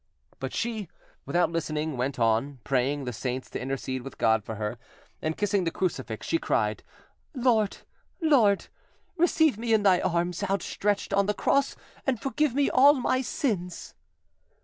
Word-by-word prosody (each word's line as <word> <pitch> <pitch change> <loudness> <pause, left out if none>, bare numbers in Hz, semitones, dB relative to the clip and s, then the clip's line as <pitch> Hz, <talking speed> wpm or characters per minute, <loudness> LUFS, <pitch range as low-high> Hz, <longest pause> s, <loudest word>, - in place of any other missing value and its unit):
But - - -4
she, 225 -4 -3 0.4
without 175 -1 +2
listening, 155 -2 -2
went 130 +2 -2
on, 115 +4 +1
praying 135 +2 0
the 125 -1 -4
saints 130 +3 -4
to - - -4
intercede 130 0 -3
with 135 +1 -9
God 110 -1 +3
for 110 - -6
her, 105 0 -4 0.4
and 155 0 -2
kissing 205 -2 +1
the 165 - +1
crucifix, 130 - -3
she 330 - +1
cried— - - 0 0.5
"Lord! 235 -5 +2 0.4
Lord! 250 - +4 0.5
receive 320 - +3
me 230 -1 +2
in 210 - +1
Thy 185 -3 +5
arms 175 0 -1
out 200 0 0
stretched 205 0 -1
on 200 0 +3
the 210 - 0
cross, 275 0 +1 0.3
and 255 -4 +1
forgive 270 +2 0
me 280 0 +3
all 280 +3 +6
my 255 0 +1
sins!" 190 - -3
185 Hz, 160 wpm, -27 LUFS, -, 0.5 s, all